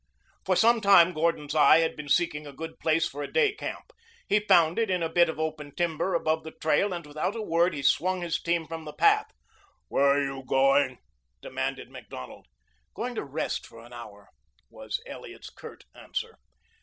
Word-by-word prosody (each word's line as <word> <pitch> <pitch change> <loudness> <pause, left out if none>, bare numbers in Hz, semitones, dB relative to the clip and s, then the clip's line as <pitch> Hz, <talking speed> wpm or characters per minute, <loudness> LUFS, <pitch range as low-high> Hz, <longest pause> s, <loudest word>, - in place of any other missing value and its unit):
For - - +1
some 230 0 +4
time 190 -4 +6
Gordon's 155 -2 -1
eye 155 0 +6
had 165 - -1
been 150 -1 -8
seeking 150 -2 +1
a - - -8
good 160 +4 -8
place 165 +1 +2
for 145 - -8
a - - -6
day 455 -4 +3
camp. 440 +3 -7 0.4
He 210 - +3
found 175 -4 +3
it 225 -3 0
in 180 -2 0
a 165 0 -3
bit 175 -1 +4
of 160 - -5
open 155 -2 -4
timber 175 +1 -1
above 160 -1 0
the 160 - -7
trail, 160 +6 +2
and 170 -3 -5
without 155 +8 -3
a 225 - -4
word 170 -2 +1
he 140 - -5
swung 185 +6 +2
his 170 -2 -2
team 170 -1 0
from 160 0 -7
the 150 - -8
path. 420 0 +3 0.6
"Where 140 - +2
are 140 0 +3
you 135 -1 -5
going?" 135 0 +2 0.5
demanded - - -4
Macdonald. 65 - -10 0.5
"Going 245 +1 -4
to 225 - -4
rest 145 +3 -4
for 115 0 -14
an 120 - -15
hour," 105 -4 -11 0.4
was - - -5
Elliot's - - -10
curt - - -12
answer. - - -6
160 Hz, 195 wpm, -27 LUFS, 145-180 Hz, 0.6 s, time